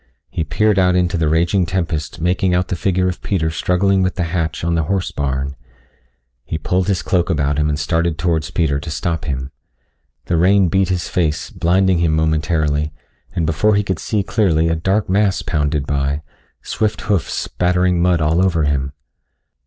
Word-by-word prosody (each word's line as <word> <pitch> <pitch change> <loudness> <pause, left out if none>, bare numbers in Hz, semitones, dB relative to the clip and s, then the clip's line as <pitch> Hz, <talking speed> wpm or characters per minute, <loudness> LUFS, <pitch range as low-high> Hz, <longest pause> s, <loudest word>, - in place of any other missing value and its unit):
He 80 - -1
peered 100 +7 +1
out 90 -1 +3
into 90 -1 +1
the 80 -2 +1
raging 85 +3 +2
tempest 85 -4 -3
making 90 +2 +1
out 90 0 0
the - - -1
figure 90 +1 0
of 90 - -3
Peter 80 -5 -1
struggling 95 +4 +1
with 90 0 0
the 90 - -1
hatch 80 -3 -2
on 85 0 0
the 80 -2 +1
horse 95 +1 -1
barn. 70 -1 -2 0.9
He 80 - -4
pulled 90 +4 -1
his 95 -6 0
cloak 90 +1 +1
about 70 -3 0
him 75 0 +1
and 75 - 0
started 80 +2 0
towards 80 -2 0
Peter 75 -5 0
to 80 - -7
stop 80 +1 -2
him. 65 -1 -3 0.7
The 85 - 0
rain 95 +2 +4
beat 95 +2 +1
his 90 -2 -1
face, 80 -4 -1
blinding 90 +1 +2
him 80 -2 +2
momentarily, 80 -1 0 0.4
and 85 - 0
before 80 +7 +2
he 105 - +2
could 95 -4 -2
see 105 -3 -1
clearly 85 -7 +1
a 80 - +1
dark 95 +5 0
mass 100 0 +1
pounded 75 -3 -1
by, 70 +1 -1 0.4
swift 110 -1 -1
hoofs 100 -5 -1
spattering 90 0 0
mud 90 -2 +2
all 80 +4 +2
over 85 -4 +1
him. 70 -1 -1
85 Hz, 185 wpm, -18 LUFS, 75-90 Hz, 0.9 s, rain